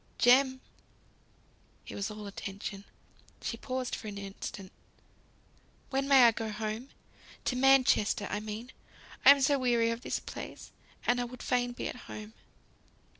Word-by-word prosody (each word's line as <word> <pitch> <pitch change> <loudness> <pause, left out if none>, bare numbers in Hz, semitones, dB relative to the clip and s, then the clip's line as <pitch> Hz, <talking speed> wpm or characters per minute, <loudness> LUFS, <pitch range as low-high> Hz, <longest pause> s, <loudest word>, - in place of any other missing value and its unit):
"Jem!" 260 +1 +5 1.2
He - - -8
was 200 +1 -3
all 210 0 -8
attention. 200 0 -6 0.5
She - - -3
paused 255 +2 -4
for 220 - -8
an 205 -1 -6
instant. 195 -1 -7 1.2
"When 270 0 0
may 270 -2 +7
I 235 - +8
go 225 0 -4
home? 215 +4 -4 0.6
To 250 - 0
Manchester, 255 -6 +4
I 205 - -1
mean. 215 +4 -6 0.5
I - - +9
am 280 0 +8
so 280 +1 +3
weary 235 -2 +2
of 230 +1 -4
this - - -2
place; - - -8 0.3
and 245 0 +2
I - - -1
would 245 +1 -9
fain 245 -1 0
be - - -4
at - - -5
home." 215 +1 -8
235 Hz, 150 wpm, -31 LUFS, 210-255 Hz, 1.2 s, I